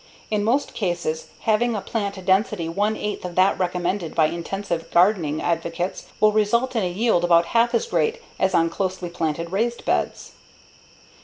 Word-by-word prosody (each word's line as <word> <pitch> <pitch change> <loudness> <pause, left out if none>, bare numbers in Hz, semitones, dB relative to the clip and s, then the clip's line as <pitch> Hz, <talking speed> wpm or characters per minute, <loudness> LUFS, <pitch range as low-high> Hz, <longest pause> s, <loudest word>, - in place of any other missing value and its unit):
In 210 -1 +1
most 250 +7 +1
cases 175 -5 -2
having 230 +2 +2
a - - -1
plant 200 -4 -4
density 190 -2 +2
one 205 +6 0
eighth 210 0 -4
of 180 -1 -6
that 185 +2 +3
recommended 180 -1 -1
by 160 - +4
intensive 170 +1 -3
gardening 170 -5 +3
advocates 170 +1 -2
will 215 0 +5
result 235 +4 +1
in 225 - +2
a 180 - 0
yield 190 -1 +1
about 170 -1 +5
half 235 +1 +3
as 470 - +1
great 470 0 0 0.2
as 190 -1 +2
on 165 0 +3
closely 185 -1 -3
planted 165 0 -2
raised 235 +5 -1
beds. - - -1
190 Hz, 165 wpm, -23 LUFS, 170-215 Hz, 0.2 s, will